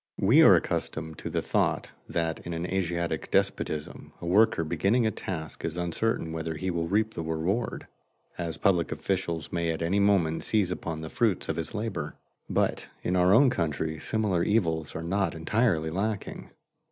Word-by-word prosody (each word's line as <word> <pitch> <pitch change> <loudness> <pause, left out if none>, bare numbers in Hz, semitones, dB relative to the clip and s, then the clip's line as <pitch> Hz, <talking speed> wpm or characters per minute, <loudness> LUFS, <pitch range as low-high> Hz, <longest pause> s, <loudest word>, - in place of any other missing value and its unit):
We - - +6
are - - +9
accustomed 80 -1 -2
to - - -5
the - - -1
thought - - 0 0.2
that 80 -1 -1
in 85 - -6
an 85 +1 -3
Asiatic 85 -2 -2
despotism 75 -1 -1
a - - -7
worker 100 +1 +4
beginning 100 +9 +1
a 110 - +2
task 80 -5 -5
is 85 +1 -3
uncertain 85 0 -1
whether 80 0 -3
he 95 +5 -2
will 85 -1 -1
reap 110 +4 +1
the - - -4
reward, 80 +8 -2 0.5
as 85 -3 -3
public 90 -5 +2
officials 85 -5 -2
may 85 -1 0
at 80 0 -2
any 95 +5 +1
moment 95 -6 +2
seize 105 -5 +1
upon 80 -3 -4
the 80 - -7
fruits 110 -6 +1
of - - 0
his 85 +6 -3
labor. 100 -9 -3 0.3
But - - 0 0.2
in 90 - 0
our 90 0 +4
own 125 +5 +6
country 80 - -2
similar 105 -6 0
evils 80 -8 0
are 80 - -4
not 95 0 0
entirely 80 -2 +1
lacking. 100 +3 -3
85 Hz, 175 wpm, -28 LUFS, 80-100 Hz, 0.5 s, are